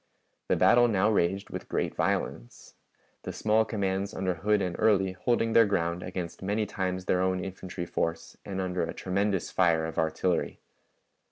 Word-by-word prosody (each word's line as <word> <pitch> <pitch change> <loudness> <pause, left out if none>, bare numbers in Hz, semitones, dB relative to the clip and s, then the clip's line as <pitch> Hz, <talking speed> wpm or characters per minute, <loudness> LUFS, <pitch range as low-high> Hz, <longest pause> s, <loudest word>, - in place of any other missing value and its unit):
The - - +2
battle 120 0 +5
now 105 -1 +2
raged 100 0 0
with - - -7
great - - -1
violence, - - -3 0.5
the - - -5
small 110 +1 +2
commands 100 -2 -2
under 95 -1 0
Hood 105 +5 +1
and 90 -3 -2
Early 100 -4 +3
holding 115 +4 0
their 115 -2 +6
ground 85 -3 -1
against 90 -2 -6
many 105 +3 0
times 95 -2 -3
their 90 - +2
own 95 0 +1
infantry 95 -2 -6
force 85 -1 -3
and 95 -1 -5
under 90 -1 -1
a 80 - -3
tremendous 100 +1 -1
fire 85 -3 +2
of 80 - -4
artillery. 80 +2 0
95 Hz, 165 wpm, -28 LUFS, 90-105 Hz, 0.5 s, their